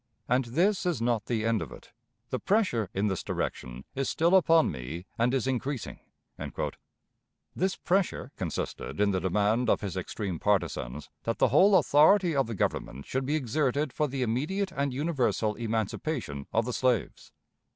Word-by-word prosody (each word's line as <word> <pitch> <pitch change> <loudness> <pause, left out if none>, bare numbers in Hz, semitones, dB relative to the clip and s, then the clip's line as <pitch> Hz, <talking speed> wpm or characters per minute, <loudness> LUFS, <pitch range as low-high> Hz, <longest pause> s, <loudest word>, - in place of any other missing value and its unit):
And 125 +1 +2
this 180 - +1
is 175 -5 0
not 115 -2 0
the 110 -2 -1
end 115 -2 +1
of 75 -7 -6
it. - - -13 0.4
The - - -1
pressure 185 - +1
in 100 +2 -1
this 95 -4 -1
direction 60 +1 -4
is 135 -1 -1
still 170 +3 +2
upon 165 -3 +5
me, 70 +8 -6
and 120 +2 +2
is 130 -2 0
increasing." 130 0 -3 1.6
This 190 +1 0
pressure 180 -7 0
consisted 95 +2 -4
in 105 0 +3
the 95 - +1
demand 105 +6 +1
of - - +3
his 100 -4 -4
extreme 95 -1 -4
partisans 75 -9 -1
that 115 - -2
the - - +3
whole 200 +1 +6
authority 165 +3 +5
of 135 -4 +2
the 115 - -4
Government 70 -6 -2
should 130 0 -2
be 150 - +1
exerted 140 +1 0
for 150 - +1
the 135 -1 -2
immediate 155 - -1
and 140 -4 -1
universal 130 -6 0
emancipation 110 - -3
of 115 0 +1
the 125 - -3
slaves. 125 -4 0
125 Hz, 165 wpm, -28 LUFS, 105-150 Hz, 1.6 s, whole